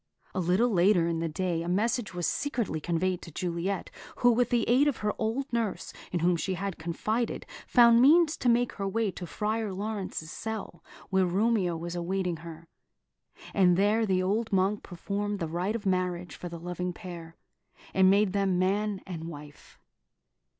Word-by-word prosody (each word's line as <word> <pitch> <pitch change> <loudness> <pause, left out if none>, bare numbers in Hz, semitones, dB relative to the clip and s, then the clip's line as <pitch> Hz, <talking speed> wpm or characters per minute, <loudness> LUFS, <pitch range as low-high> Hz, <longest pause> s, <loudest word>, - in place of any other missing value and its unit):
A - - -2
little 185 +8 +2
later 180 -2 +4
in 165 -1 -1
the 165 0 -1
day 170 +1 -1
a 170 - -4
message 215 +4 0
was 175 -2 -3
secretly 235 - -1
conveyed 175 +2 -1
to - - -9
Juliet, 180 +4 -3 0.2
who, 245 - +4
with 240 +1 +2
the 240 -2 +1
aid 260 +5 +4
of 285 - +1
her 210 - +1
old 235 +5 -2
nurse, 230 -4 -2 0.2
in 175 - -1
whom 175 +1 +3
she 190 +3 -2
had 195 0 -4
confided, 215 +8 -2 0.2
found 235 -1 +6
means 315 +3 +6
to 245 - +1
make 240 +1 +3
her 195 -1 -4
way 215 +1 0
to 180 -1 -7
Friar 215 +2 -2
Laurence's 195 -5 -4
cell, 215 -7 -6 0.3
where 190 -1 +3
Romeo 190 -2 +1
was 170 +1 -5
awaiting 180 0 -1
her; 165 0 -10 0.9
and 180 -3 +4
there 215 +3 +3
the 185 -1 +2
old 215 +4 0
monk 195 +2 +2
performed 200 +3 -3
the 165 - -3
rite 180 +7 -2
of 225 -2 -5
marriage 180 -3 -1
for 175 - -7
the 170 - -7
loving 180 +1 -4
pair, 170 -4 -9 0.6
and 190 0 +5
made 200 0 +3
them 195 -2 +1
man 200 +2 0
and 170 -4 -6
wife. 150 -3 -11
190 Hz, 180 wpm, -28 LUFS, 175-220 Hz, 0.9 s, found